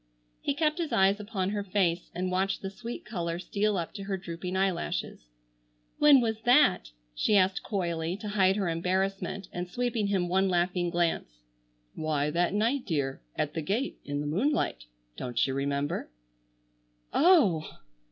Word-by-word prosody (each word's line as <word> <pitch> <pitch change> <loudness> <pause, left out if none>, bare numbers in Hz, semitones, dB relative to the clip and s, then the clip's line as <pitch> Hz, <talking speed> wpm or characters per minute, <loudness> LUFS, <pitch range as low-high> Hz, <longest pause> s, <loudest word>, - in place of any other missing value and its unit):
He 280 - -1
kept 310 +2 +1
his 330 -3 -2
eyes 195 +2 +3
upon 200 -3 -2
her 205 -1 -2
face 180 -3 0
and 185 +1 -2
watched 190 +2 0
the 195 - -4
sweet 235 +4 -7
color 170 -5 -3
steal 200 +3 0
up 170 -2 -3
to 200 -1 -7
her 195 -1 -2
drooping 180 +1 -5
eyelashes. 185 - -2 0.7
"When 290 -3 +7
was 220 -2 -1
that?" 245 - +4 0.2
she - - +2
asked 190 0 +2
coyly, 170 -3 -2
to 210 0 -6
hide 190 -2 +3
her 200 -3 0
embarrassment, 190 +3 -1
and 175 0 -4
sweeping 235 -1 -1
him 190 -3 +1
one 190 +2 +2
laughing 175 0 +1
glance. 165 - -1 0.5
"Why, 150 -2 -1
that 175 +4 +1
night, 235 +6 +1
dear, 140 -6 -1
at 150 - -1
the 165 - -2
gate, 215 - -2
in 145 0 -3
the - - -4
moonlight. 170 - 0 0.3
Don't 120 -2 0
you 135 - -2
remember?" 140 - -2 1.0
"Oh 300 - +5
h - - -10
h - - -12
h!" - - -21
190 Hz, 170 wpm, -29 LUFS, 170-210 Hz, 1.0 s, When